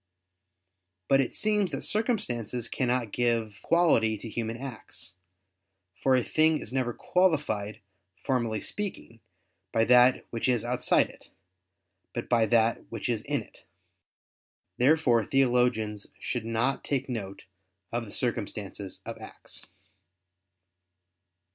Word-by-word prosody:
But 135 0 +5
it 130 - -3
seems 210 -4 +1
that 135 - -3
circumstances 125 - -1
cannot 125 -4 0
give 115 -3 0
quality 135 -11 +3
to 110 - -8
human 115 +1 -3
acts; 125 -8 -7 0.9
for 135 -1 +4
a 125 - +2
thing 155 +3 +3
is 125 - -7
never 130 -2 0
qualified, 145 - 0 0.4
formally 120 -5 -1
speaking, 195 - -4 0.5
by 115 0 +3
that 125 +1 +5
which 115 +2 -1
is 120 -2 +2
outside 125 +1 +3
it; - - -18 0.9
but 120 - -3
by 115 -2 +3
that 115 +1 +3
which 115 - -4
is 115 -3 0
in 145 -1 -2
it. - - -19 1.2
Therefore 125 -4 +4
theologians 125 -6 +1
should 120 -3 -3
not 115 +4 0
take 135 -2 -1
note 100 -6 -5 0.5
of 120 0 -2
the 100 - -11
circumstances 105 -5 -3
of - - -6
acts. - - -8
120 Hz, 120 wpm, -28 LUFS, 110-135 Hz, 1.2 s, But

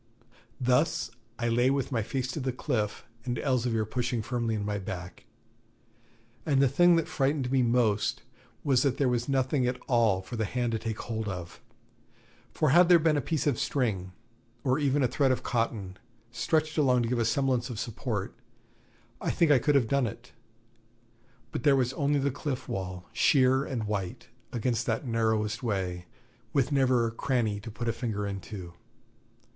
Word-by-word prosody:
Thus 130 +5 +1 0.3
I 120 - -1
lay 120 +2 +3
with 135 0 0
my 120 -3 +1
face 130 +4 -2
to 155 - -4
the 130 -1 -1
cliff, 105 -4 -2 0.2
and 120 -1 -2
Elzevir 120 -4 0
pushing 120 0 -2
firmly 115 -2 -1
in 105 -1 -3
my 105 0 -2
back; 90 -2 -7 1.2
and 140 -3 +2
the 135 - +5
thing 175 +7 +5
that 165 -2 +1
frightened 135 -2 0
me 135 -1 +3
most 115 -4 +1 0.4
was 135 -4 +3
that 135 -3 +1
there 140 - +2
was 120 +1 0
nothing 130 -1 +1
at 125 0 -2
all 115 -6 +2
for 120 +5 -7
the 110 - 0
hand 120 +2 -1
to 115 - -1
take 110 -1 -4
hold 110 -2 -4
of, 90 +1 -6 0.9
for 155 - +1
had 175 +3 +6
there 175 - +9
been 160 -1 +2
a 145 - +1
piece 150 +2 -1
of 140 -6 +1
string, 100 -9 -1 0.5
or 130 +2 +2
even 140 -1 +2
a - - +4
thread 135 +2 +2
of 130 - -1
cotton, 105 -5 -2 0.3
stretched 155 +6 0
along 125 -4 +3
to 115 - -1
give 125 -1 0
a - - +3
semblance 125 +1 +1
of 115 -4 -5
support, 115 -3 -3 0.9
I - - -1
think 170 -4 +3
I 140 - +6
could 145 +4 +2
have 130 -5 +3
done 140 0 +2
it; 120 +4 -9 1.2
but - - -3
there 140 +2 +5
was 130 -1 +1
only 145 0 +1
the 140 0 +1
cliff 135 -1 -4
wall, 90 -1 -4
sheer 130 -3 +4
and 120 -4 -3
white, 105 +2 -4 0.2
against 120 0 -1
that 115 +4 -1
narrowest 110 -2 0
way, 95 -6 -2 0.5
with 135 0 +2
never 130 -4 +3
cranny 115 -3 -1
to 105 - -8
put 120 +2 -5
a 115 - +1
finger 110 -4 -3
into. 95 -2 -6
120 Hz, 180 wpm, -28 LUFS, 110-135 Hz, 1.2 s, there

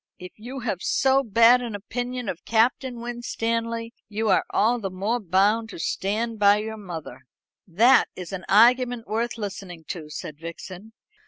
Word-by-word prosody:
If 180 0 -10
you 250 +5 -8
have 210 -6 -3
so 270 0 +2
bad 235 +1 +5
an 235 -4 -5
opinion 245 +3 -5
of 180 - -5
Captain 240 +2 +1
Winstanley, 230 -1 -3 0.2
you 215 +1 -1
are - - +4
all 235 +4 +2
the 195 -3 -3
more 200 +6 -1
bound 205 +4 +2
to - - -9
stand 215 +6 -2
by 205 0 +6
your 220 +1 -4
mother." 160 - -9 0.4
"That 230 +9 +5
is 180 0 -8
an 185 -1 -5
argument 245 +2 +4
worth 235 +2 -2
listening 195 -5 -7
to," 160 -4 -6
said 150 0 -7
Vixen. 180 +5 -9
220 Hz, 160 wpm, -24 LUFS, 190-235 Hz, 0.4 s, by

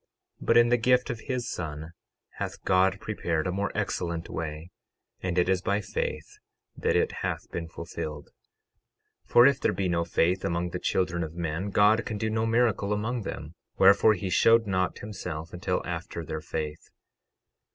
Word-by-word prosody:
But - - +3
in 120 0 +6
the 120 0 +3
gift 125 +2 +3
of 115 - -5
his 125 -1 -3
Son 80 -1 -5 0.5
hath - - -5
God 95 +1 +3
prepared 85 -8 -2
a 90 - 0
more 100 +2 -1
excellent 85 -5 -2
way; 80 +2 -5 0.5
and 90 -1 -2
it 90 - +3
is 95 -1 +2
by 100 +1 0
faith 105 - -4 0.4
that - - 0
it - - +2
hath - - -3
been 85 -1 -4
fulfilled. 80 -3 -7 1.0
12:12 - - -27
For 120 - +8
if 140 0 +4
there - - +1
be 95 -2 -1
no 85 -1 +1
faith 85 +2 +1
among 85 +1 -1
the - - -3
children 90 -2 0
of 80 0 -7
men 85 +3 -2
God 105 +3 +4
can 110 - -4
do 110 +1 -1
no 110 +1 0
miracle 115 -3 +2
among 110 +4 -2
them; 75 -5 -6 0.2
wherefore, 105 +2 +6
he 95 0 -4
showed 115 +4 +5
not 95 -2 0
himself 90 -6 -6
until 90 0 -2
after 85 - -5
their 80 0 -4
faith. 75 0 -5
95 Hz, 175 wpm, -27 LUFS, 85-110 Hz, 1.0 s, For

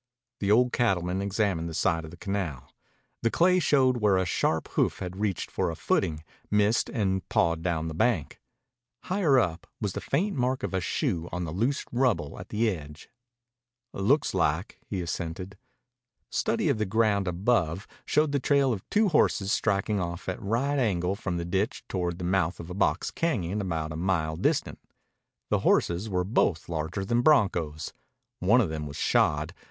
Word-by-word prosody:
The 100 - -1
old 125 +4 +4
cattleman 95 -5 +1
examined 100 -4 0
the 80 - -6
side 80 0 +1
of - - -9
the 85 - -12
canal. 95 - -4 0.5
The 115 - +2
clay 180 +7 +4
showed 130 -6 +3
where 105 -4 +3
a 95 - +1
sharp 80 -1 0
hoof - - +1
had 90 0 -6
reached 100 -4 -1
for - - 0
a - - -4
footing, 75 -1 0 0.3
missed, 105 +2 +2
and 95 - -1
pawed 85 -1 +2
down 80 -2 -1
the 80 - -4
bank. 80 - 0 0.6
Higher 180 -8 +2
up 90 -8 0
was 100 -4 -2
the - - -4
faint 190 +8 0
mark 130 0 0
of - - -3
a 95 - 0
shoe 85 0 -1
on 90 0 -3
the 80 - -4
loose 115 - 0
rubble 120 - 0
at - - -9
the 115 +2 +1
edge. 75 -6 -5 0.8
"Looks 135 +10 +2
like," - - 0
he 95 - -3
assented. 90 +2 -5 0.8
Study - - 0
of - - +1
the 110 - +1
ground 105 -2 +2
above 90 -1 0 0.2
showed 150 0 +2
the 140 - +1
trail 140 -1 +3
of 100 - -4
two 210 -1 +3
horses 105 - +2
striking 105 0 +1
off 85 -1 -4
at 95 - -3
a - - -15
right 125 +8 0
angle 95 -6 +1
from 95 -4 -3
the 85 - -3
ditch 95 +5 -1
toward 90 -2 -2
the 90 - -6
mouth 90 -1 0
of 85 +1 -8
a - - -4
box 90 -3 0
cañon 105 - -1
about 80 -5 -2
a - - -5
mile 80 -2 0
distant. - - 0 0.7
The - - +3
horses 90 +6 +1
were 90 -2 0
both 90 -4 +1
larger 85 +4 -3
than 120 +4 +2
broncos. 90 - +2 0.5
One 110 +8 +4
of 95 - 0
them 75 -1 -4
was 70 - -8
shod. 75 +3 +1
95 Hz, 180 wpm, -27 LUFS, 85-115 Hz, 0.8 s, old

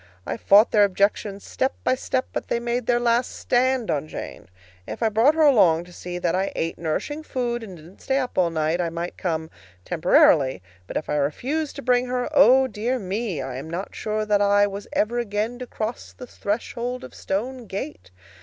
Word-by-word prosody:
I 115 - -3
fought 200 - +5
their 210 -2 +5
objections 200 0 0
step 265 - -1
by - - +3
step, 260 0 -1
but - - -3
they 235 - 0
made 240 0 -2
their 240 -1 +3
last 240 +1 +1
stand 255 -1 +1
on 150 0 -1
Jane. - - -8 0.4
If - - -5
I 225 - +3
brought 230 +8 +4
her 320 - +3
along 185 - +5
to 175 0 -15
see 175 0 -6
that 175 -1 0
I 190 +1 0
ate 165 0 -2
nourishing 170 - -2
food 240 -5 -2
and 195 -5 -9
didn't 165 +5 -16
stay 270 - 0
up 255 -2 -2
all 180 -2 +3
night, 160 +1 0
I 170 - -1
might 170 +1 -5
come 160 -3 -3 0.3
temporarily; 140 - +4 0.2
but - - -3
if - - -4
I 150 - 0
refused 265 - -1
to 280 - -7
bring 250 0 +2
her 250 0 -1
oh, 260 +4 +6
dear 245 +1 -2
me, 195 - -3
I 130 -1 -5
am 145 +4 -7
not 175 +4 -5
sure 215 0 -2
that 205 -1 +2
I 205 0 +4
was 200 0 -6
ever 235 +3 0
again 220 +2 -2
to 250 - -6
cross 220 +1 -5
the 250 - -10
threshold 240 +3 -4
of - - -10
Stone 240 +5 -4
Gate! 150 - -6
210 Hz, 205 wpm, -24 LUFS, 175-245 Hz, 0.4 s, oh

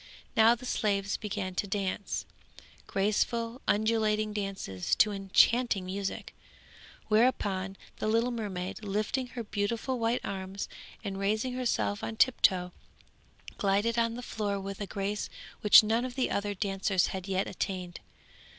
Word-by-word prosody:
Now 225 +1 +6
the 245 +2 -11
slaves 200 -5 0
began 190 -3 -3
to 200 - -1
dance, 200 0 -2 0.6
graceful 230 +4 0
undulating 215 0 +2
dances 195 - -2
to 210 - +4
enchanting 200 +2 +3
music; 195 +1 -4 0.7
thereupon 200 -4 +2 0.2
the - - -2
little 230 +3 +2
mermaid, 205 -4 -4
lifting 215 +6 -1
her 240 -1 -6
beautiful 225 +5 -2
white 230 +1 +1
arms 190 0 -4 0.4
and 195 -2 -4
raising 215 +5 0
herself 240 -4 -1
on 225 - -3
tiptoe, 185 -7 +3 0.9
glided 205 +4 +2
on 230 0 +1
the 245 - -6
floor 205 -4 -2
with 195 +1 -6
a 200 - -3
grace 205 +1 -3 0.3
which 210 +1 +9
none 225 +3 +1
of 255 -1 -5
the 260 - 0
other 205 0 -1
dancers 195 -1 +1
had 190 0 -5
yet 190 0 0
attained. 180 -2 -4
205 Hz, 135 wpm, -30 LUFS, 195-230 Hz, 0.9 s, which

